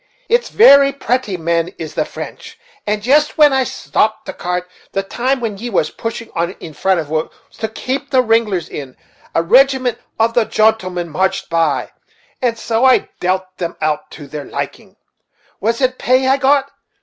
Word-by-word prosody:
It's 475 +1 +2
varry 280 -9 +7
pratty 250 -7 -1
men 170 0 0
is 160 -2 -6
the - - 0
French; - - -9 0.3
and 210 0 -1
jist 295 +5 +3
when 295 -2 +6
I 265 0 +3
stopt 215 -3 -1
the - - -6
cart, 180 0 -3 0.3
the 195 - 0
time 255 +7 -1
when 220 -5 -4
ye 240 +2 -4
was 180 -8 0
pushing 230 0 -6
on 170 +1 -1
in 160 -5 -11
front 190 +3 +1
it 160 - -3
was, 155 +1 -1 0.3
to 220 - -1
kape 255 +5 -4
the 260 -2 +3
riglers 220 -6 +1
in, 135 -3 -8 0.4
a 165 - +3
rigiment 255 +4 +3 0.2
of 230 +1 +3
the 235 -2 +3
jontlemen 185 -6 +1
marched 190 +4 -1
by, 165 -3 +1 0.5
and 240 -2 0
so 225 +1 -1
I 260 -1 +4
dealt 185 +1 0
them 170 -2 -3
out 150 0 -1
to 150 - -10
their 145 +1 -7
liking. - - -6 0.6
Was 230 +5 -1
it 255 0 +1
pay 255 +1 +2
I 265 +1 +4
got? 275 0 +2
220 Hz, 180 wpm, -17 LUFS, 175-255 Hz, 0.6 s, varry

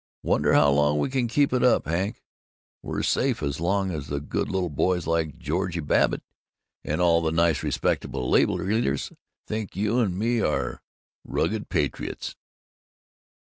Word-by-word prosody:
Wonder - - +2
how 75 -1 +5
long 75 +1 +3
we 75 - 0
can 130 -3 +1
keep 140 +3 +2
it 125 - +2
up, 125 - +4
Hank? 95 - -2 0.6
We're - - -3
safe - - +1
as 70 0 -2
long 95 +3 0
as 75 -4 -5
the 70 0 -2
good 70 - -3
little 95 -3 -1
boys 90 +4 0
like 80 -2 -1
George 90 -4 -2
Babbitt - - +2 0.6
and 75 +2 -2
all 85 -2 +4
the 80 -1 0
nice 85 -3 +2
respectable 65 -2 -1
labor - - +3
leaders 95 - -1 0.3
think 110 -2 -4
you 105 +5 +1
and 95 -7 0
me 115 +2 +1
are 75 - -1 0.4
rugged 110 0 -2
patriots. 75 -7 -2
85 Hz, 155 wpm, -25 LUFS, 75-105 Hz, 0.6 s, how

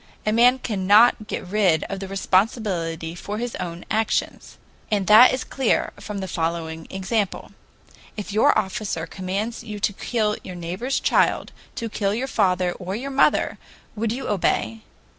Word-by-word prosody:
A 215 - +2
man 245 +3 +5
cannot 210 0 +3
get - - -4
rid 185 -5 +2
of 195 - -5
the 195 - -6
responsibility, 185 -4 0
for 200 +4 -6
his 240 +1 -3
own 175 -2 -6
actions. 220 0 -1 0.3
And 205 -3 0
that 215 +6 +8
is 255 - -2
clear 265 -4 0
from 210 - -6
the 190 - -4
following 165 -1 -3
example. 195 +1 -2 0.7
If 205 -1 -5
your 215 - +4
officer 205 -5 -2
commands 195 +6 -4
you 210 -1 -7
to 205 - +1
kill 215 0 -1
your 185 - -8
neighbor's 180 +10 -2
child, - - +2 0.2
to 230 - -3
kill 205 -2 -1
your 250 +4 -2
father 180 -8 +1
or 185 +2 -5
your 270 +5 -5
mother, 275 - +2 0.4
would 220 0 -1
you 255 +4 -4
obey? 115 - 0
205 Hz, 160 wpm, -23 LUFS, 180-225 Hz, 0.7 s, that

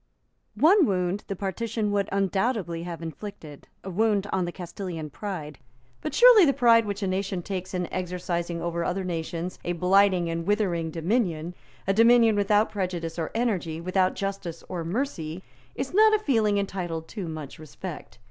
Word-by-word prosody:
One 320 - +5
wound 185 +1 0
the 195 - -3
partition 210 +3 -2
would 200 -1 0
undoubtedly 195 -3 0
have 170 -1 -6
inflicted, 160 -2 -8 0.2
a 190 - -6
wound 205 +1 +2
on 185 -2 +1
the 175 - -4
Castilian 175 -3 -6
pride. 160 -8 -6 0.4
But - - -4
surely 485 -4 +8
the 280 -4 +4
pride 230 -4 +5
which 200 0 -3
a - - 0
nation 190 -1 -2
takes 185 0 -5
in 180 -1 -1
exercising 175 -2 -3
over 170 0 -1
other 185 +3 -1
nations 170 0 -4
a 175 - -1
blighting 185 0 +3
and 165 0 -3
withering 185 -6 +1
dominion, 170 -1 -1 0.3
a 195 - +2
dominion 230 0 +5
without 205 +1 +2
prudence 175 -4 -3
or 160 - -2
energy, 190 -9 -1
without 185 +2 +1
justice 195 -4 -4
or 175 -2 -4
mercy, 175 - -3 0.3
is 270 +3 -4
not 435 +2 +6
a 425 - -2
feeling 220 -7 +2
entitled 175 -5 -3
to 200 -6 -5
much 155 -1 -7
respect. 155 -6 -9
185 Hz, 165 wpm, -26 LUFS, 170-210 Hz, 0.4 s, surely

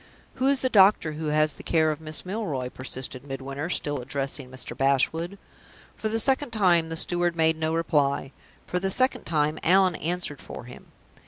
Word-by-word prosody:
"Who 265 - +3
is 275 -1 +2
the 260 - +2
doctor 195 -7 +5
who 155 +1 -5
has 155 0 +2
the - - -12
care 160 -2 +2
of 155 +1 -6
Miss 155 +1 -4
Milroy?" 180 - -3
persisted 130 0 -6
Midwinter, 140 +3 -5
still 145 -5 -1
addressing 135 0 -4
Mr. 130 0 -6
Bashwood. 160 +7 +1 0.6
For 220 - -3
the 225 +1 0
second 270 +3 +3
time 180 -7 +2
the 165 - -2
steward 175 0 +2
made 160 -1 +3
no 160 0 -1
reply. 145 -5 +1 0.3
For 180 - -2
the 190 +1 -1
second 255 +7 +1
time, 155 -1 0
Allan 185 +1 +4
answered 170 -3 -3
for - - -9
him. 125 0 -12
160 Hz, 180 wpm, -26 LUFS, 140-180 Hz, 0.6 s, doctor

